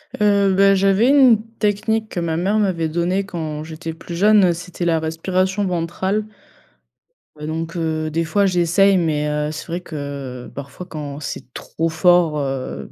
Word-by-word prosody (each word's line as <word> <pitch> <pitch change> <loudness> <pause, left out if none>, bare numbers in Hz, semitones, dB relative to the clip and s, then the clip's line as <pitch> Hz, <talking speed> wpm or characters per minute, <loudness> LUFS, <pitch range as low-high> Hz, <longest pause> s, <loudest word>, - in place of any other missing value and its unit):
Heu, 200 -2 +3
bah 195 0 +5
j'avais 195 +5 +3
une 260 -6 +6 0.2
technique 215 +1 0
que - - -4
ma 165 -1 -1
mère 195 +5 +1
m'avait 180 -6 0
donnée 175 +4 -1
quand 155 -5 -5
j'étais 165 0 -6
plus 170 +1 -8
jeune, 195 -1 +5
c'était 175 +1 -6
la 165 -2 +2
respiration 185 +5 -1
ventrale 185 +4 -1 1.1
donc, 160 +2 -5
heu, 160 -2 -1
des 165 +2 -1
fois, 195 +5 +2
j'essaie, 185 +2 +3
mais, 150 -3 0
heu, 150 0 -1
c'est 155 - -7
vrai 170 +2 -4
que 140 -6 -7
parfois 140 +6 -8
quand 145 -3 -6
c'est 130 -3 -7
trop 165 +1 -3
fort, 165 -1 +3
heu, 135 -2 -4
170 Hz, 160 wpm, -20 LUFS, 155-195 Hz, 1.1 s, une